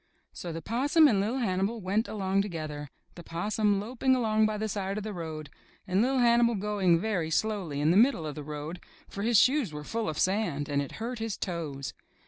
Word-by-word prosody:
So 175 - -6
the 165 0 -6
Possum 285 - +4
and 205 -7 +3
Li'l' 225 +6 -1
Hannibal 205 -1 0
went 205 +4 0
along 195 -2 0
to 205 - -3
gether, 150 -4 -5 0.2
the 175 - -10
Possum 205 +5 0
loping 255 +5 +1
along 220 -3 +2
by 215 0 -2
the 220 +1 -2
side 195 -1 -3
of 215 - -3
the 215 0 -5
road, 155 -4 -6 0.3
and 190 +1 +1
Li'l' 260 +3 +2
Hannibal 235 -1 +4
going 195 -4 +2
very 185 -5 -1
slowly 185 -5 -1
in 150 +2 +3
the 180 - +4
middle 230 - +4
of 150 - -4
the 150 - -7
road, 150 +3 -6 0.3
for 200 - -7
his 230 +1 +3
shoes 260 - +4
were 150 0 -6
full 225 +5 -2
of 155 - -4
sand 185 -7 0
and 140 -1 +1
it 140 - -6
hurt 235 +2 -5
his 225 -3 -3
toes. 155 -7 -4
200 Hz, 215 wpm, -29 LUFS, 165-220 Hz, 0.3 s, Possum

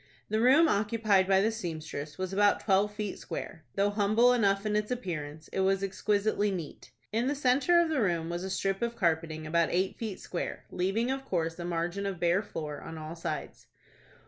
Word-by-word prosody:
The 215 +1 +1
room 275 +7 +6
occupied 210 -4 +2
by 190 0 +4
the 220 +3 +2
seamstress 155 -7 -5
was 185 0 -3
about 205 +1 +4
twelve 200 0 +2
feet 210 -1 -4
square. 160 -2 -7
Though 200 +1 +2
humble 215 +4 +4
enough 200 -4 +2
in 210 0 0
its 210 0 0
appearance, 160 -10 -4
it - - -3
was 195 +1 +2
exquisitely 205 +1 +1
neat. 175 -10 -6 0.2
In 230 +3 +1
the 285 - 0
centre 280 +5 +3
of 340 -1 +2
the 315 - 0
floor 175 -8 +1
was 170 +2 -4
a 190 - -4
strip 195 +1 -1
of 235 0 -1
carpeting 160 -5 0
about 165 +1 +2
eight 185 +2 0
feet 215 -5 -4
square, 175 - -5
leaving, 205 +7 0
of 270 0 -3
course, 165 -7 -2
a 175 - -4
margin 175 +3 -2
of 190 -3 -4
bare 175 +3 +3
floor 155 -7 -6
on 165 - -8
all 155 +1 -7
sides. 165 - -5
195 Hz, 200 wpm, -30 LUFS, 170-220 Hz, 0.2 s, room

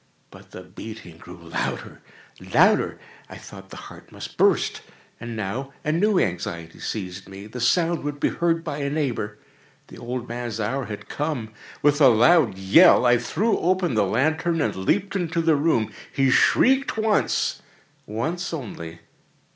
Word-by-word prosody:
But - - -15
the 90 - -10
beating 90 -3 -10
grew 90 +1 -12
louder, 85 -1 -5 0.5
louder! - - +3 0.3
I - - -9
thought 95 -1 -12
the - - -10
heart - - -12
must - - -9
burst. - - +2 0.4
And 120 0 -6
now 115 +7 -4
a 150 - +1
new 200 +5 +2
anxiety 85 - -3
seized 95 -2 -6
me—the 105 +5 -9
sound 170 +6 +2
would 145 0 -4
be - - +2
heard 165 -1 0
by 150 -3 -4
a 140 -1 -1
neighbour! 125 -8 -2 0.5
The - - -12
old 125 0 -5
man's 120 -1 -5
hour 125 +5 -2
had 105 -2 -8
come! 145 -8 -4 0.3
With 145 +1 +3
a 135 - +9
loud 120 - +4
yell, 125 - +6
I 120 0 +5
threw 215 - 0
open 185 -4 +1
the 110 - +2
lantern 160 - 0
and 145 - 0
leaped 195 - -1
into 175 -2 -1
the 165 -1 +3
room. 140 -7 +1 0.2
He 135 -1 +2
shrieked 265 - +3
once—once 175 - -2
only. 85 - -8
130 Hz, 155 wpm, -23 LUFS, 105-165 Hz, 0.5 s, a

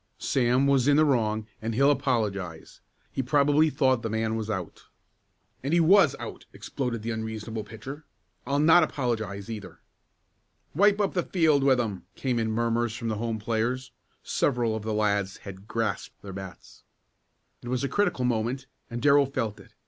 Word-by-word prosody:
"Sam 125 +1 +2
was 140 -2 +3
in 145 0 +5
the 155 - +5
wrong 110 -6 +1 0.2
and 110 0 -3
he'll 140 +4 +5
apologize. 105 - -2 0.3
He - - -2
probably 145 +3 +3
thought 130 -5 +2
the 115 - -3
man 110 0 -1
was 110 -1 -3
out." 95 -5 -5 0.8
"And 140 +4 -1
he 170 - +5
was 175 -2 +5
out!" - - -8
exploded 125 -5 -4
the 115 - -2
unreasonable 110 0 -4
pitcher. 130 +8 -9 0.4
"I'll 140 +1 +1
not 160 +4 +6
apologize, 110 - -2
either." 100 -7 -8 0.9
"Wipe 205 +5 +4
up 200 -2 +1
the 180 - +1
field 160 -6 +2
with 135 -2 +4
'em!" 105 -6 -3
came 125 -3 -1
in 110 -1 0
murmurs 115 0 0
from 115 -2 -4
the 110 - -2
home 115 -1 -1
players. 120 +4 -2 0.3
Several 120 -5 0
of 110 - -4
the 110 +1 -3
lads 100 -2 0
had 100 0 -9
grasped 115 -4 -3
their 100 -1 -8
bats. 95 -1 -10 0.8
It - - -10
was 125 +1 -1
a - - +1
critical 200 -8 0
moment 120 +2 -1 0.2
and 120 0 -5
Darrell 140 -1 +5
felt 115 -6 -3
it. 100 - -17
120 Hz, 170 wpm, -27 LUFS, 110-140 Hz, 0.9 s, not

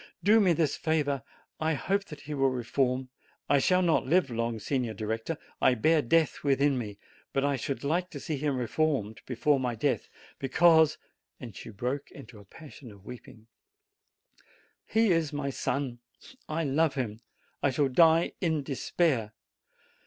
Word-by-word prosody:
Do 215 +3 +6
me 190 -4 +4
this 155 -3 +1
favor! 145 -4 0 0.4
I 160 0 +1
hope 195 +7 -1
that 150 -5 -10
he 150 - -6
will 135 -1 +2
reform. 130 +1 -1 0.4
I 140 - +4
shall 180 +6 +3
not 165 -6 +2
live 160 -3 +2
long, 115 0 -2
Signor 120 0 -2
Director; 110 +9 -3 0.2
I 130 - +4
bear 155 +7 +3
death 160 +5 +1
within 140 0 +2
me; 105 -4 -6 0.4
but 135 0 +1
I 140 -1 +1
should 135 +1 -4
like 175 +5 0
to 145 - -8
see 155 +2 -3
him 140 -1 -1
reformed 125 -3 -1
before 135 +3 +1
my 125 -2 -2
death, 135 +4 -1 0.3
because" 160 +3 +4 0.4
and 115 -6 -9
she - - -9
broke 125 +7 -4
into 125 -6 -13
a 100 - -15
passion 140 +1 -13
of 100 -1 -17
weeping 115 -1 -11 1.4
"he 225 -2 +3
is 165 -3 +1
my 145 -2 -3
son 130 -2 -2 0.5
I 160 +2 -1
love 145 +1 +1
him 115 -5 -3 0.4
I 140 - +3
shall 135 +2 +1
die 165 +5 +4
in 160 -5 0
despair! 135 -4 0
140 Hz, 160 wpm, -29 LUFS, 125-160 Hz, 1.4 s, Do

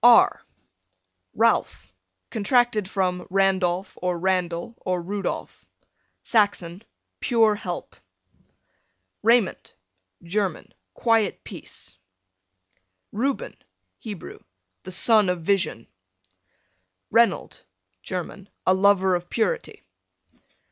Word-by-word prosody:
R - - +6 0.9
Ralph, - - +1 0.4
contracted 225 -2 +2
from 180 -2 -1
Randolph, 190 -1 +1
or 180 -1 0
Randal, 180 +2 -1
or 180 -1 -1
Rudolph, 195 +4 -4 0.6
Saxon, 200 -5 +1 0.4
pure 225 -4 +3
help. 205 - -6 1.3
Raymond, 230 -2 +2 0.5
German, 190 0 -2 0.2
quiet 225 -4 +1
peace. 95 - -8 1.2
Reuben, 275 - -2 0.4
Hebrew, 205 -6 -8 0.4
the 185 - -9
son 210 +1 +4
of 180 -2 -1
vision. 180 - 0 1.3
Reynold, 235 0 +2 0.4
German, 185 - -6 0.2
a 185 - +5
lover 190 -1 +4
of 175 0 -2
purity. 465 - -2
195 Hz, 80 wpm, -24 LUFS, 180-220 Hz, 1.3 s, R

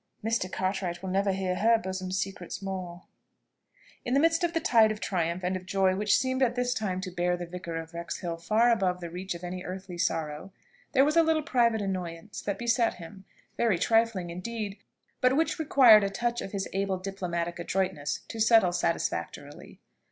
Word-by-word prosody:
Mr. 225 -5 0
Cartwright 185 -2 -2
will 190 - -3
never 195 +1 +2
hear 190 -1 -1
her 230 +1 +4
bosom 190 -3 -5
secrets 190 -2 -4
more." 185 -2 -6 1.0
In 245 - 0
the - - +5
midst 330 +2 +3
of 340 -1 +1
the 330 - +1
tide 225 -7 +4
of 215 - -5
triumph 175 -2 -2
and 180 +1 0
of 185 0 -7
joy 190 -1 +2
which 205 +1 +3
seemed 260 0 -1
at 245 -2 +2
this 245 0 0
time 200 -6 -2
to 185 -1 -5
bear 175 0 0
the 175 - -5
Vicar 170 -1 -7
of 165 +1 -6
Wrexhill 170 0 -4
far 220 +8 +3
above 185 -5 +1
the 170 -2 -7
reach 180 +1 -4
of 170 - -10
any 180 +1 -5
earthly 185 -1 -7
sorrow, 160 +1 -2 0.4
there 270 0 +5
was 305 +2 +1
a 335 - +7
little 320 -1 +2
private 235 -5 +2
annoyance 185 +1 -5
that 200 - -3
beset 235 0 +1
him, 190 +3 -11 0.3
very 225 -6 +2
trifling 225 -3 +1
indeed, 205 +3 -5 0.4
but 255 +2 +4
which 325 +2 +1
required 250 -8 +7
a 200 - 0
touch 235 +4 -2
of 195 - -6
his 195 -1 -3
able 195 0 0
diplomatic 175 -3 -4
adroitness 170 -4 -2
to 225 - -7
settle 220 -5 +5
satisfactorily. 155 -4 -3
190 Hz, 190 wpm, -28 LUFS, 180-230 Hz, 1.0 s, a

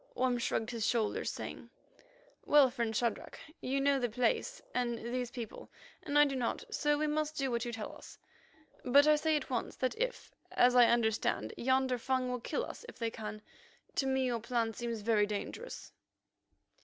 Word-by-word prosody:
Orme 250 -1 +1
shrugged 225 -1 -1
his 230 -2 -3
shoulders, 225 -4 0
saying: - - -7 0.7
"Well, 285 -3 +6
friend 235 -3 -2
Shadrach, 235 -2 -1 0.2
you 270 +2 0
know 280 0 +3
the 245 -2 0
place 250 - 0
and 240 -1 0
these 240 +1 -3
people, 240 -3 -8 0.3
and 290 0 -1
I 295 - +8
do 275 -2 -2
not, 245 -3 -1
so 295 -1 +1
we 305 - 0
must 305 0 -1
do 270 -2 0
what 235 0 -1
you 240 - -3
tell 225 -2 -6
us. - - -13 0.7
But 280 +3 +6
I 305 0 +6
say 310 +1 +1
at 295 - -3
once 245 - -2
that 255 - -1
if, - - -3 0.2
as 245 0 +5
I 245 -1 +8
understand, 220 - +1
yonder 260 0 +1
Fung 255 +1 0
will 250 - -2
kill - - -2
us - - -9
if - - -12
they 230 -1 -2
can, 215 -1 -7 0.5
to 270 - 0
me 265 0 +1
your 240 -2 0
plan 230 -1 -1
seems 235 -1 -4
very 210 -1 +3
dangerous." 210 - -6
250 Hz, 185 wpm, -33 LUFS, 230-275 Hz, 0.7 s, I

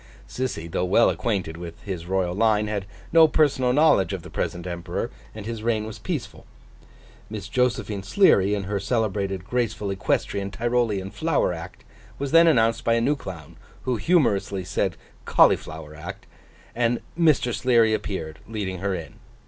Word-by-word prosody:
Sissy, 125 -11 -3
though 85 - -2
well 95 +6 +4
acquainted 95 -8 -2
with 85 -1 -8
his 90 -4 -5
Royal 95 -2 0
line, 105 +1 +2
had 105 -2 -3 0.3
no 165 -1 +8
personal 140 -5 +2
knowledge 125 - +4
of 95 -4 -5
the 90 - -11
present 85 +2 -3
Emperor, 85 -1 -4 0.2
and 110 -2 -7
his 115 -1 -5
reign 110 -1 0
was 110 -1 -8
peaceful. 165 - -5 0.8
Miss 105 -2 -6
Josephine 115 -4 0
Sleary, 100 - +4
in 100 - -3
her 100 +1 -2
celebrated 100 -4 -1
graceful 110 -4 -1
Equestrian 100 +1 -1
Tyrolean 115 -3 -1
Flower 155 - 0
Act, 85 +2 -9 0.3
was 140 -1 -3
then 165 +1 +7
announced 115 -7 +3
by 115 - +3
a - - +2
new 135 +6 +2
clown 85 - -9 0.3
(who 125 -2 0
humorously 100 - +1
said 90 -1 -1 0.3
Cauliflower 80 -1 +2
Act), 75 - -8 0.5
and 120 0 +1
Mr. 155 -7 +3
Sleary 115 0 +3
appeared, 95 -7 -4
leading 100 -5 -4
her 100 0 -1
in. 85 -3 -8
105 Hz, 155 wpm, -24 LUFS, 95-120 Hz, 0.8 s, no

